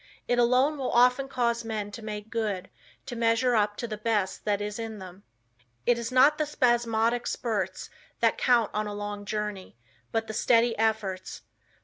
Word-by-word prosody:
It 245 - +2
alone 255 +5 +3
will 260 - -1
often 250 +3 +4
cause 235 -3 0
men 215 -2 -4
to 205 - -8
make 215 0 -6
good; 205 -5 -2 0.3
to 255 -2 -6
measure 230 +2 +2
up 210 -2 +1
to 235 - -4
the 215 -2 -6
best 215 -3 -1
that 205 -1 +1
is 205 +1 -4
in 225 -1 -5
them. 185 0 -11 0.6
It 240 -1 +3
is 235 +1 -4
not 275 +4 +5
the 305 - +1
spasmodic 240 -3 +1
spurts 225 -4 -3 0.3
that - - +3
count 240 -3 +2
on 215 0 -1
a 205 - -5
long 205 0 -5
journey, 210 - -4 0.3
but 225 0 0
the 220 - -6
steady 230 +1 +3
efforts. 210 -4 -2
225 Hz, 180 wpm, -27 LUFS, 210-240 Hz, 0.6 s, not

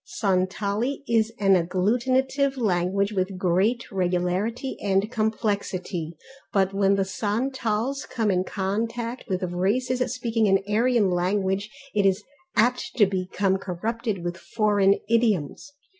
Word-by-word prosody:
Santali 200 +6 0
is 225 -1 +2
an 195 -2 +4
agglutinative 255 +10 +1
language 200 -2 +1
of 190 -1 -2
great 190 +7 +1
regularity 185 +7 -1
and 200 +2 +1
complexity 200 -7 -2 0.3
but 195 -2 +2
when 195 0 +3
the 195 -1 +1
Santals 235 +5 -2
come 225 -4 0
in 185 -1 +1
contact 230 +6 -3
with 185 -2 -2
races 205 +9 0
speaking 230 -3 0
an 195 0 +5
Aryan 220 -1 +2
language 190 +3 0 0.2
it 205 - +2
is 190 0 +1 0.3
apt 245 +3 +1
to 220 -5 +6
become 190 0 0
corrupted 210 +2 -3
with 175 0 -3
foreign 205 -2 +2
idioms. 225 - 0
205 Hz, 120 wpm, -25 LUFS, 190-230 Hz, 0.3 s, to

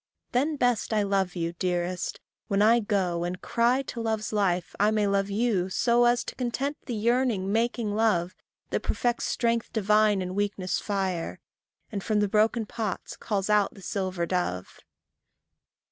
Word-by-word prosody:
Then 285 +5 +1
best 245 -4 +1
I 210 -1 +2
love 195 -2 0
you, 170 -1 -2
dearest, 175 0 -2 0.3
when 200 - +1
I 230 +2 +6
go 190 -5 0
And 180 +1 -3
cry 245 +3 +1
to 240 -3 -6
love's 220 -1 -2
life 185 -4 0
I 205 +1 +4
may 215 -1 +1
love 200 0 +1
you 200 -3 +1
so 240 +5 +3
As 240 +1 +3
to - - -6
content 270 +3 -2
the 240 - -2
yearning, 225 -3 +1
making 230 -1 0
love, 195 -5 +1 0.4
That - - +1
perfects 240 -1 -1
strength 230 -1 0
divine 210 -1 +3
in 180 0 -4
weakness' 200 -2 -1
fire, 190 -4 -2 0.5
And 200 -3 -4
from 215 -1 +1
the 205 - +2
broken 220 +2 +2
pots 215 -2 -4
calls 200 -3 -2
out 210 -1 +2
the 195 - -13
silver 185 -4 -2
dove. 170 - -2
210 Hz, 160 wpm, -27 LUFS, 185-230 Hz, 0.5 s, I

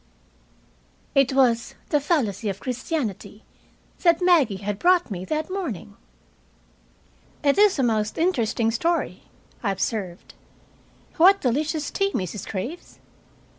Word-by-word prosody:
It 275 -2 +3
was 240 -3 +2
"The 295 - +3
Fallacy 245 - 0
of 195 0 -4
Christianity" 250 - -4 0.6
that 340 -2 +4
Maggie 335 - +4
had 205 -1 -2
brought 355 -7 +3
me 185 -1 -4
that 310 - -3
morning. 345 - -5 1.5
"It 280 +5 +3
is 415 -4 +5
a 270 - +1
most 215 -3 0
interesting 235 -9 +1
story," 335 +9 -1 0.4
I 210 - -1
observed. 195 -2 -4 0.8
"What 380 +4 +6
delicious 300 +3 -1
tea, 395 0 0
Mrs. 185 +1 -4
Graves! 245 - -6
265 Hz, 115 wpm, -24 LUFS, 215-335 Hz, 1.5 s, What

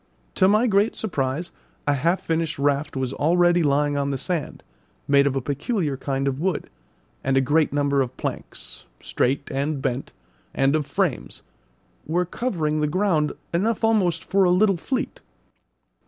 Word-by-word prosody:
To 185 - +4
my 215 +4 +4
great 205 -1 +2
surprise 150 -4 -2 0.3
a 145 - +3
half 165 +7 +1
finished 165 -1 -1
raft 145 +1 0
was 130 -1 -2
already 175 +2 +3
lying 145 -1 +2
on 140 0 0
the 135 - -1
sand, 165 +3 -3 0.4
made 140 0 +5
of 135 - -1
a 135 - 0
peculiar 145 - -1
kind 135 0 -2
of 135 0 -1
wood, 180 0 -2 0.5
and 135 0 +1
a - - +6
great 145 +4 +2
number 140 -1 +1
of 130 -1 -4
planks, - - -6
straight 140 +3 -1
and 140 +2 -1
bent, 130 0 -3 0.4
and 135 +2 +3
of 150 -2 -1
frames, - - -2 0.6
were 175 +3 +1
covering 165 -7 -1
the 150 - +2
ground, 165 -3 +1 0.2
enough 215 +7 0
almost 190 -7 +2
for 195 0 +2
a 180 - +4
little 195 +2 +4
fleet. 255 +10 -3
150 Hz, 160 wpm, -23 LUFS, 140-180 Hz, 0.6 s, a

